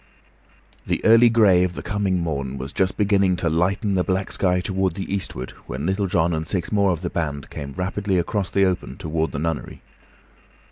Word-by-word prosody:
The -, -, -1 dB
early 115 Hz, +2 st, +7 dB
gray 105 Hz, -6 st, +5 dB
of 90 Hz, -1 st, -2 dB
the -, -, -6 dB
coming 100 Hz, -2 st, 0 dB
morn 70 Hz, -5 st, -3 dB
was 65 Hz, +2 st, -6 dB
just 95 Hz, -1 st, 0 dB
beginning 100 Hz, -3 st, +3 dB
to 85 Hz, -1 st, -1 dB
lighten 95 Hz, +5 st, +1 dB
the 90 Hz, -1 st, +2 dB
black 95 Hz, +1 st, -1 dB
sky 90 Hz, -1 st, +1 dB
toward 95 Hz, -1 st, -1 dB
the 95 Hz, 0 st, -4 dB
eastward 65 Hz, -10 st, -3 dB, 0.2 s
when 70 Hz, +3 st, -4 dB
Little 95 Hz, +2 st, 0 dB
John 85 Hz, -2 st, +1 dB
and 80 Hz, 0 st, -2 dB
six 90 Hz, -4 st, -2 dB
more 100 Hz, -2 st, +3 dB
of 85 Hz, -3 st, -1 dB
the 90 Hz, -, -3 dB
band 75 Hz, -4 st, -3 dB
came 70 Hz, -2 st, -6 dB
rapidly 95 Hz, +3 st, -1 dB
across 95 Hz, +2 st, -1 dB
the 100 Hz, 0 st, +3 dB
open 90 Hz, -1 st, -2 dB
toward 80 Hz, -3 st, -2 dB
the -, -, -5 dB
nunnery. 80 Hz, +2 st, -4 dB
90 Hz, 195 wpm, -22 LUFS, 80-100 Hz, 0.2 s, early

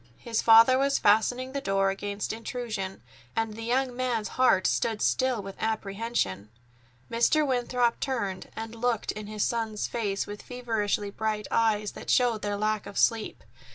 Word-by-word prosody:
His 230 Hz, -2 st, -2 dB
father 230 Hz, +3 st, +7 dB
was 275 Hz, 0 st, +2 dB
fastening 245 Hz, +5 st, +2 dB
the 280 Hz, 0 st, -3 dB
door 195 Hz, -3 st, +1 dB
against 200 Hz, +2 st, -4 dB
intrusion, 220 Hz, -, -5 dB, 0.3 s
and 225 Hz, -1 st, -1 dB
the 225 Hz, -, -8 dB
young 250 Hz, +2 st, 0 dB
man's 245 Hz, -4 st, -1 dB
heart 225 Hz, -8 st, +3 dB
stood 220 Hz, +3 st, +1 dB
still 255 Hz, -3 st, +1 dB
with 195 Hz, 0 st, -8 dB
apprehension. 205 Hz, -, -2 dB, 0.6 s
Mr. 270 Hz, +7 st, +3 dB
Winthrop 245 Hz, -2 st, +1 dB
turned 205 Hz, -8 st, -3 dB
and 225 Hz, 0 st, -6 dB
looked 230 Hz, -1 st, -1 dB
in 215 Hz, -1 st, -7 dB
his 215 Hz, -1 st, -2 dB
son's 225 Hz, -3 st, -1 dB
face 205 Hz, -4 st, -2 dB
with 205 Hz, 0 st, -8 dB
feverishly 220 Hz, -5 st, -2 dB
bright 215 Hz, 0 st, -2 dB
eyes 210 Hz, -2 st, +2 dB
that -, -, -10 dB
showed 240 Hz, -4 st, +3 dB
their 205 Hz, 0 st, -2 dB
lack 215 Hz, 0 st, -1 dB
of 200 Hz, -, -8 dB
sleep. 225 Hz, -2 st, +1 dB
225 Hz, 155 wpm, -27 LUFS, 205-245 Hz, 0.6 s, father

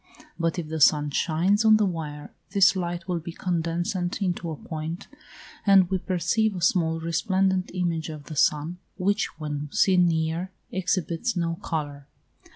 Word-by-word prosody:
But 165 Hz, 0 st, 0 dB
if 170 Hz, -3 st, -3 dB
the 160 Hz, 0 st, -4 dB
sun 145 Hz, 0 st, +5 dB
shines 180 Hz, +8 st, +2 dB
on 220 Hz, -1 st, +7 dB
the 215 Hz, -, +2 dB
wire, 155 Hz, -5 st, -5 dB, 0.2 s
this 195 Hz, -1 st, +5 dB
light 175 Hz, -2 st, -3 dB
will 180 Hz, -2 st, -1 dB
be 170 Hz, +1 st, -7 dB
condensed 170 Hz, 0 st, -2 dB, 0.3 s
into 180 Hz, -3 st, -2 dB
a 160 Hz, -, -4 dB
point, 160 Hz, +4 st, -6 dB, 0.6 s
and 195 Hz, -2 st, +5 dB
we 190 Hz, -, +1 dB
perceive 190 Hz, +5 st, 0 dB
a 180 Hz, -, -5 dB
small 165 Hz, -2 st, +2 dB
resplendent 185 Hz, +3 st, 0 dB
image 170 Hz, -3 st, -1 dB
of 155 Hz, -2 st, -7 dB
the 155 Hz, -, -8 dB
sun, 150 Hz, +4 st, +1 dB, 0.2 s
which, 200 Hz, +2 st, +1 dB
when 150 Hz, -1 st, -4 dB
seen 180 Hz, -2 st, +4 dB
near, 165 Hz, +2 st, -1 dB, 0.2 s
exhibits 185 Hz, +3 st, -1 dB
no 165 Hz, -1 st, 0 dB
colour. 145 Hz, -3 st, -4 dB
170 Hz, 160 wpm, -25 LUFS, 160-185 Hz, 0.6 s, on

